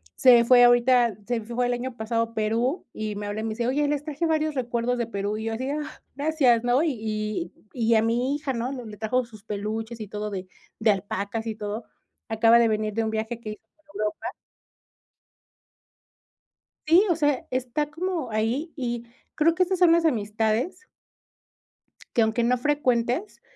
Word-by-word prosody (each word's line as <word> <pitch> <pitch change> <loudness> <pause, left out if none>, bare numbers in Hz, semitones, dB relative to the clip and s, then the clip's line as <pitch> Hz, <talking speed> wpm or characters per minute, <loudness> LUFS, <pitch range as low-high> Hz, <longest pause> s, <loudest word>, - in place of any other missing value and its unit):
se 245 -2 +7
fue 245 +1 +7
ahorita 245 -2 +5
se 240 -2 -1
fue 240 +3 -1
el 245 - +1
año 245 0 -4
pasado 230 +1 0
a 230 0 -7
Perú 230 - 0
y 215 -1 -4
me 205 0 -5
habla 205 +1 -3
y - - -5
me 225 - -2
dice: 235 +2 -2
"Oye, 290 +3 +1
les 290 -1 -1
traje 305 +2 -2
varios 310 -1 +1
recuerdos 245 -1 -1
de 235 -1 -1
Perú". 205 0 -3
Y 220 - -5
yo 225 - -2
así 245 +4 -3
de: 285 - -1
"Ah, 300 0 -6
gracias", 280 -5 +3
¿no? 250 +5 +3
Y 320 - +1
y 215 -5 -3 0.2
y 230 -2 +2
a 220 - +5
mi 245 +5 +1
hija, 295 -2 -3
¿no?, 245 +2 -2
le 250 -3 -7
le 210 -1 -9
trajo 245 +4 0
sus 215 -3 -15
peluches 220 +2 -4
y 215 - -5
todo 210 0 -4
de 190 -2 -5 0.3
de 220 -1 +4
alpacas 200 +3 -3
y 220 - -3
todo. 215 +1 -5 0.4
Acaba 225 +1 +5
de 230 - +4
venir 215 -1 -1
de 225 - 0
un 220 - -1
viaje 220 +2 -3
que 215 -2 -6
hizo 210 - -11
por 310 - -35
Europa. 210 0 -2 2.6
Sí, 355 +6 +6
o 345 - +3
sea, 290 -4 0
está 255 +3 -1
como 330 -4 -3
ahí 230 +9 -1
y 240 -4 -3 0.3
creo 325 +2 +3
que 370 - +4
esas 370 0 -1
son 345 -2 +6
las 340 - +3
amistades 225 - 0 1.3
que, 235 - +3
aunque 220 +2 +2
no 250 +1 +3
frecuentes, 255 - 0
235 Hz, 195 wpm, -25 LUFS, 220-275 Hz, 2.6 s, se